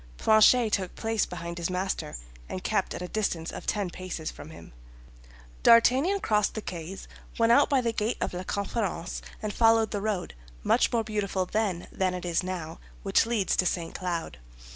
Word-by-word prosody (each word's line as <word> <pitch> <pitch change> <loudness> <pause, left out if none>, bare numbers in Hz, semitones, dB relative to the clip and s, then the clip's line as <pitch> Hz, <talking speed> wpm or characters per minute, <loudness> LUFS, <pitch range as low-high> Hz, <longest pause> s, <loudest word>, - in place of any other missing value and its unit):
Planchet 220 +1 +5
took 185 -2 -1
place 225 -1 0
behind 170 -1 -6
his 170 - -1
master, 185 +1 -2 0.3
and - - -5
kept - - 0
at - - -5
a - - -4
distance 175 -5 -2
of - - -8
ten 200 -4 -1
paces 180 -4 -5
from 145 - -11
him. 85 - -12 0.9
D'Artagnan 265 +12 +5
crossed 210 -1 +1
the 220 - -3
quays, 175 +2 -7 0.3
went 230 0 +4
out 280 +4 +5
by 275 -2 +3
the 230 -2 -1
gate 220 +2 -1
of - - -2
La 180 - -3
Conférence 195 -2 -3 0.2
and 210 -1 -2
followed 225 -1 +4
the 205 - -2
road, 205 - -2 0.3
much - - +3
more 230 -2 +1
beautiful 200 -3 -1
then 195 -3 -1
than 185 -1 0
it 180 - -6
is 170 0 +1
now, 175 -3 -5 0.2
which 195 +3 +3
leads 220 -5 +1
to 185 - +2
St. 170 -2 -2
Cloud. 170 - -4
195 Hz, 185 wpm, -28 LUFS, 180-225 Hz, 0.9 s, Planchet